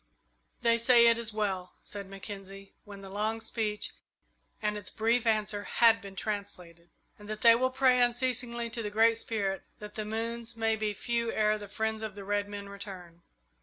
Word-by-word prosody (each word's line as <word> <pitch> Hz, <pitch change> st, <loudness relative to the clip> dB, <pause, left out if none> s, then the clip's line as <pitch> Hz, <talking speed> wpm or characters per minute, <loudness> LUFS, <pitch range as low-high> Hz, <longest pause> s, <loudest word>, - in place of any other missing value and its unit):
"They 235 Hz, 0 st, +4 dB
say 235 Hz, 0 st, +6 dB
it 230 Hz, 0 st, +3 dB
is 225 Hz, -1 st, -2 dB
well," 195 Hz, -4 st, -2 dB
said 200 Hz, -2 st, -7 dB
Mackenzie, 195 Hz, 0 st, -9 dB
when 200 Hz, -1 st, -10 dB
the 195 Hz, -, -9 dB
long 215 Hz, +3 st, -1 dB
speech 220 Hz, -2 st, -2 dB, 0.7 s
and 210 Hz, -1 st, -1 dB
its 205 Hz, -3 st, -5 dB
brief 230 Hz, +2 st, +1 dB
answer 215 Hz, -2 st, +1 dB
had 230 Hz, -1 st, +5 dB
been 200 Hz, -2 st, -10 dB
translated; 180 Hz, -5 st, -5 dB, 0.3 s
"and 210 Hz, 0 st, -12 dB
that 215 Hz, 0 st, -5 dB
they 230 Hz, -1 st, +9 dB
will 255 Hz, +3 st, +2 dB
pray 260 Hz, -1 st, +4 dB
unceasingly 240 Hz, -1 st, +1 dB
to 230 Hz, -, -3 dB
the 210 Hz, -, -3 dB
Great 225 Hz, +2 st, +4 dB
Spirit 195 Hz, -5 st, -1 dB, 0.2 s
that 210 Hz, 0 st, -9 dB
the 215 Hz, -, -3 dB
moons 230 Hz, +2 st, -4 dB
may 225 Hz, 0 st, +2 dB
be 215 Hz, -1 st, -2 dB
few 235 Hz, +1 st, -1 dB
ere 215 Hz, 0 st, +2 dB
the 205 Hz, -, -8 dB
friends 220 Hz, +2 st, -2 dB
of 215 Hz, -2 st, -5 dB
the 200 Hz, -1 st, -8 dB
red 205 Hz, 0 st, 0 dB
men 200 Hz, -1 st, -6 dB
return." 190 Hz, -4 st, -8 dB
215 Hz, 185 wpm, -30 LUFS, 200-230 Hz, 0.7 s, they